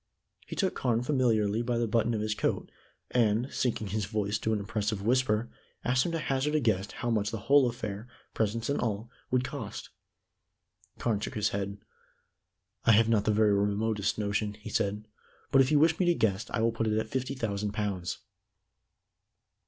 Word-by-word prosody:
He - - -6
took 190 -3 +1
Carne 120 -2 0
familiarly 115 -6 +2
by 120 0 -1
the 115 0 +1
button 115 +1 +1
of 105 - -1
his 110 0 0
coat, - - -1 0.4
and, 115 +2 +2
sinking 110 -4 -1
his 105 +1 -1
voice 105 0 -1
to 110 - -1
an 110 - +2
impressive 105 0 -2
whisper, 120 -1 +1 0.3
asked 125 +5 +2
him - - -2
to - - +1
hazard 150 0 0
a - - +4
guess 105 -6 +1
how 120 -1 -3
much 105 -2 +1
the 115 - -4
whole 140 -3 +5
affair, 110 -1 -5 0.3
presents 115 +1 -1
and 140 - 0
all, 110 0 -2 0.2
would 125 0 +2
cost. 125 -5 -6 1.1
Carne 110 -4 0
shook - - -5
his 105 0 +1
head. 100 0 -3 1.1
"I 115 - +6
have 110 +1 +5
not 105 -3 +2
the 110 - +3
very 105 -1 +4
remotest 105 +1 0
notion," 105 0 -1
he 105 0 -9
said. 105 +2 -1 0.4
"But 135 - +6
if 130 - +3
you 150 - +4
wish 160 +2 +4
me 180 - +2
to 175 - +4
guess, 105 -5 0
I 110 - -1
will 115 +1 +3
put 115 0 -1
it 110 0 +1
at 110 - -1
fifty 130 +2 -2
thousand 105 -4 -2
pounds." 100 -5 -2
110 Hz, 190 wpm, -29 LUFS, 105-125 Hz, 1.1 s, I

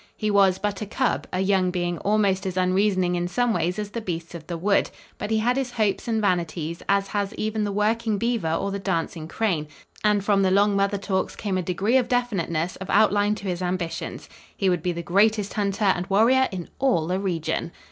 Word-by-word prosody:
He 215 -1 0
was 195 -2 +4
but 205 -1 -3
a 210 - -4
cub, 255 +4 -1
a 185 - -1
young 190 -1 +2
being 175 -2 -2
almost 200 -1 +1
as 185 -1 -4
unreasoning 185 0 +2
in 175 0 -1
some 245 +5 +1
ways 180 -1 -1
as 210 -1 -4
the 230 - -4
beasts 170 -5 -5
of 160 -2 -9
the 170 - -4
wood, 200 +4 +2 0.3
but 205 - -4
he 220 - +2
had 240 +3 +2
his 270 -2 -1
hopes 215 -3 0
and 225 -1 +1
vanities, 170 -4 -1
as 200 0 +2
has 205 0 -2
even 215 0 -1
the 205 - -1
working 215 +1 +1
beaver 230 -7 0
or 195 +4 -1
the 200 - -3
dancing 165 -3 -2
crane, 170 -6 -1 0.4
and 210 -2 +2
from 200 -1 +3
the 190 - +3
long 200 +2 +3
mother 200 +1 +1
talks 190 -1 -2
came 200 -3 -3
a 185 - +1
degree 195 +8 +1
of 250 - +1
definiteness 185 -9 -1
of 190 - -8
outline 205 -1 +3
to 200 - -7
his 180 -1 -2
ambitions. 180 -2 -3 0.3
He 195 -2 +2
would 175 -3 0
be 180 - 0
the 170 0 -5
greatest 205 +4 +2
hunter 205 0 -1
and 180 -2 +1
warrior 240 +7 +4
in 180 -3 -6
all 255 -12 +2
the 180 +3 -1
region! 170 -3 -2
195 Hz, 220 wpm, -24 LUFS, 180-210 Hz, 0.4 s, was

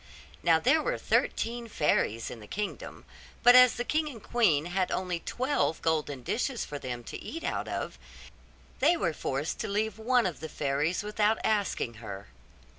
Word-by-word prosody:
Now - - +4
there - - +3
were - - -1
thirteen 235 0 0
fairies 115 - 0
in 115 - -8
the 105 - -12
kingdom; 210 - -5 0.4
but 245 - +9
as 250 -1 +8
the 245 - -2
king 305 +4 0
and 230 -7 -10
queen 170 -11 +2
had 180 +1 0
only 180 -2 -1
twelve 255 - -1
golden 150 -5 0
dishes 250 - -1
for 145 - -6
them 120 -2 -5
to - - -8
eat 330 +2 -6
out - - -2
of, - - -4 0.8
they 345 - +4
were 170 - 0
forced 140 +1 -3
to - - -2
leave 215 +2 -1
one 245 +2 +3
of 180 -4 -2
the 160 - -6
fairies 150 +7 -1
without 210 +1 +1
asking 205 - 0
her. 100 - -8
190 Hz, 175 wpm, -29 LUFS, 145-240 Hz, 0.8 s, but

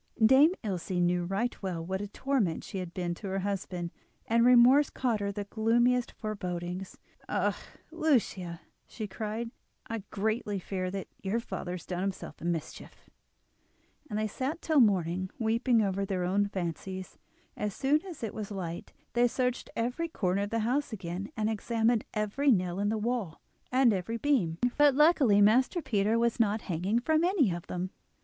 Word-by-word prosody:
Dame 275 +8 +7
Ilse 190 -5 -3
knew 175 -1 +1
right 200 +7 -2
well 175 -4 -3
what 190 +2 -2
a 205 - -4
torment 220 -6 -1
she 195 - -5
had 180 -2 -5
been 175 -1 -2
to 195 +4 -7
her 190 0 -2
husband, 185 -3 -3 0.3
and 230 +1 +3
remorse 250 +4 +7
caused 240 -5 0
her 200 0 -1
the 205 +1 -4
gloomiest 235 +4 +2
forebodings. 180 -3 -5 0.3
"Ah! - - +1 0.4
Lucia," 235 - 0 0.3
she 220 - -6
cried, 220 +3 -4 0.3
"I 225 0 -4
greatly 215 0 -1
fear 185 0 -3
that 195 0 -5
your 200 +4 0
father 185 -6 -5
has 180 - -7
done 180 -1 -3
himself 190 -5 -4
a - - -6
mischief." 170 -3 -5 1.0
And 210 - -2
they 215 - 0
sat 265 - -3
till 315 -3 +3
morning 185 -5 +2
weeping 230 +1 +2
over 195 0 0
their 190 -2 -1
own 200 +3 +2
fancies. 185 0 -5 0.4
As 210 -2 -3
soon 290 +3 +2
as 355 -10 -9
it 225 - -3
was 215 -2 -5
light 175 -4 -5 0.2
they 245 0 +4
searched 250 +1 -1
every 245 +8 -1
corner 195 - 0
of 205 - -2
the 230 0 0
house 255 +6 0
again, 185 - -5
and 215 -1 +1
examined 225 +1 +1
every 215 +7 +1
nail 185 -5 +2
in 205 +1 +1
the 220 - 0
wall 215 -6 -2 0.3
and 255 -3 +5
every 200 +5 -2
beam; 230 - +1 0.2
but, 290 -2 +6
luckily, 280 -9 +5
Master 250 - +4
Peter 215 -6 +1
was 235 +1 +1
not 215 -1 +2
hanging 185 +5 0
from 315 +6 +2
any 345 - +3
of 170 0 -5
them. 180 +1 -3
210 Hz, 170 wpm, -30 LUFS, 185-240 Hz, 1.0 s, Dame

